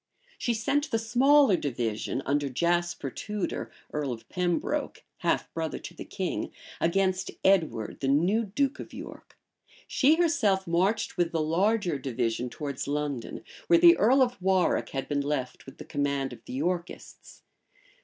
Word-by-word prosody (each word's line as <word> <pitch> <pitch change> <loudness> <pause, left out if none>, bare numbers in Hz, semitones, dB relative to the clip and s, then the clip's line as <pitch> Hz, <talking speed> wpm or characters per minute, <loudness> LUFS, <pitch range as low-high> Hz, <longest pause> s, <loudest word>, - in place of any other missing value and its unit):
She 235 - 0
sent 285 +7 0
the 225 - +1
smaller 255 +2 +4
division, 120 -4 -2
under 145 0 0
Jasper 170 0 0
Tudor, 210 - -4 0.2
earl 150 -3 -1
of 115 -2 -7
Pembroke, 180 -2 -1
half - - -1
brother 160 -1 -3
to - - -9
the - - -8
king, - - -3 0.3
against 190 +2 +1
Edward 160 - +2
the 135 - -2
new 175 +11 +2
duke 275 +8 -1
of - - -9
York. - - -10 0.5
She 295 +4 +4
herself 245 - +2
marched 190 +7 0
with 175 -1 +1
the 165 - -1
larger 180 0 +1
division 125 -2 -2
towards 140 0 -5
London, 145 -4 -3 0.2
where 345 - +6
the 340 0 +8
earl 260 +3 +5
of 245 -6 -3
Warwick 190 -1 +2
had 135 -1 -4
been 145 -1 0
left 140 -3 -3
with 135 - -11
the - - -9
command 140 -2 -1
of - - -13
the - - -8
Yorkists. 170 +5 -4
175 Hz, 155 wpm, -28 LUFS, 140-215 Hz, 0.5 s, the